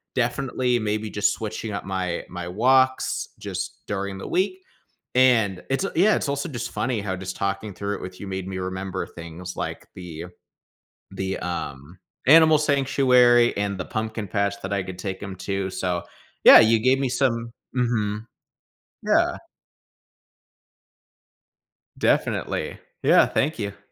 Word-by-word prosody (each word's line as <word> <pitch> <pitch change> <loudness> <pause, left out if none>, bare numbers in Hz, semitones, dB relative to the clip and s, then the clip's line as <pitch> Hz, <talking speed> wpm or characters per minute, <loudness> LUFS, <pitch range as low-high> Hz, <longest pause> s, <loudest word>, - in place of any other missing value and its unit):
Definitely, 125 0 0
maybe 110 0 -2
just 105 0 +2
switching 110 0 -5
up - - -4
my 95 -2 -3
my 90 -1 -6
walks 130 +7 +2
just - - -5
during 100 -1 -3
the - - -7
week. 200 - 0 0.6
And 115 -7 +4
it's 135 +6 0
a - - -3
yeah, 205 +6 +5
it's 145 - -2
also 140 +4 -2
just 120 -4 -5
funny 110 0 -1
how 95 -2 -3
just 95 0 -6
talking 100 +1 -3
through 100 +2 -3
it - - -11
with 90 0 -8
you 100 - -7
made 95 -1 -4
me 95 -1 -4
remember 95 0 -4
things 85 +2 -9
like - - -5
the 85 -3 -7 0.9
the, 95 0 -3
um, 80 -2 -5 0.3
animal 160 +2 +8
sanctuary 130 -4 +4
and 100 -1 -1
the 90 - -4
pumpkin 110 -1 -4
patch 100 +1 0
that 100 +1 -4
I 100 - 0
could 90 0 -8
take 95 0 -5
him 95 -1 -6
to. 95 +1 -2
So, 90 -2 -2 0.4
yeah, - - +11
you 110 0 +5
gave 130 +3 +3
me 135 - +1
some 120 -3 0 0.2
mhm. 110 -4 0 0.8
Yeah. - - +3 2.6
Definitely. - - 0 0.2
Yeah, - - +6
thank 145 -3 -1
you. 100 -1 -4
105 Hz, 150 wpm, -24 LUFS, 95-125 Hz, 2.6 s, yeah